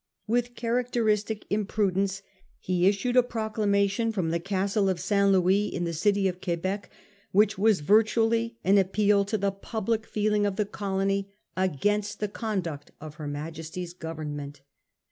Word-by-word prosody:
With 240 Hz, +2 st, 0 dB
characteristic 230 Hz, -3 st, 0 dB
imprudence 195 Hz, -2 st, 0 dB, 0.3 s
he 180 Hz, 0 st, +1 dB
issued 205 Hz, +5 st, +1 dB
a 250 Hz, -, +8 dB
proclamation 220 Hz, -2 st, 0 dB
from 185 Hz, -7 st, -1 dB
the 170 Hz, -, 0 dB
Castle 195 Hz, +2 st, 0 dB
of 185 Hz, -2 st, -1 dB
St. 200 Hz, +1 st, +2 dB
Lewis, 190 Hz, +2 st, +3 dB
in 175 Hz, -, -2 dB
the 170 Hz, -1 st, -2 dB
city 200 Hz, +4 st, +2 dB
of 180 Hz, -1 st, -4 dB
Quebec, 185 Hz, +3 st, -2 dB, 0.4 s
which 210 Hz, +2 st, +4 dB
was 210 Hz, -5 st, +3 dB
virtually 225 Hz, +5 st, +2 dB
an 200 Hz, +2 st, +5 dB
appeal 200 Hz, +1 st, +3 dB
to 215 Hz, +2 st, -1 dB
the 200 Hz, 0 st, 0 dB
public 220 Hz, +2 st, -3 dB
feeling 210 Hz, -1 st, +1 dB
of 200 Hz, -, -2 dB
the 210 Hz, -, 0 dB
colony 195 Hz, 0 st, -2 dB, 0.2 s
against 205 Hz, +4 st, 0 dB
the 210 Hz, -, -1 dB
conduct 185 Hz, -9 st, -4 dB
of 155 Hz, -1 st, -9 dB
her 150 Hz, -, -4 dB
Majesty's 160 Hz, +4 st, -6 dB
Government. 150 Hz, -4 st, -6 dB
200 Hz, 145 wpm, -27 LUFS, 185-215 Hz, 0.4 s, a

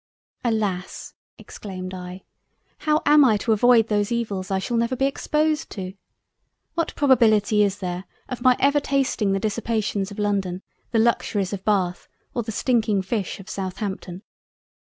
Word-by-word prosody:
"Alas! 210 Hz, -6 st, -2 dB, 0.2 s
(exclaimed 185 Hz, -2 st, -8 dB
I) 180 Hz, 0 st, -8 dB, 0.6 s
how 305 Hz, 0 st, +1 dB
am 295 Hz, 0 st, +7 dB
I 225 Hz, -5 st, +4 dB
to 225 Hz, +3 st, -1 dB
avoid 230 Hz, +1 st, +5 dB
those 205 Hz, 0 st, 0 dB
evils 205 Hz, -6 st, -2 dB
I 195 Hz, -, +1 dB
shall 215 Hz, +5 st, -2 dB
never 235 Hz, +2 st, +1 dB
be 270 Hz, -, +1 dB
exposed 305 Hz, +2 st, 0 dB
to? 185 Hz, -2 st, -6 dB, 0.8 s
What 335 Hz, -1 st, -2 dB
probability 220 Hz, -7 st, +4 dB
is 200 Hz, -1 st, +2 dB
there 180 Hz, -1 st, -4 dB, 0.2 s
of 250 Hz, -1 st, -6 dB
my 255 Hz, 0 st, +5 dB
ever 285 Hz, +2 st, +4 dB
tasting 270 Hz, -7 st, 0 dB
the 195 Hz, -, +1 dB
Dissipations 215 Hz, -2 st, -1 dB
of 200 Hz, -, -10 dB
London, 195 Hz, -3 st, -1 dB, 0.3 s
the 230 Hz, -, 0 dB
Luxuries 215 Hz, -4 st, +1 dB
of 195 Hz, -1 st, -5 dB
Bath, 185 Hz, -4 st, 0 dB, 0.3 s
or 240 Hz, -, -1 dB
the 225 Hz, 0 st, -5 dB
stinking 215 Hz, -4 st, +1 dB
Fish 195 Hz, -1 st, -3 dB
of 195 Hz, -, -12 dB
Southampton? 190 Hz, -1 st, -5 dB
210 Hz, 150 wpm, -23 LUFS, 190-240 Hz, 0.8 s, am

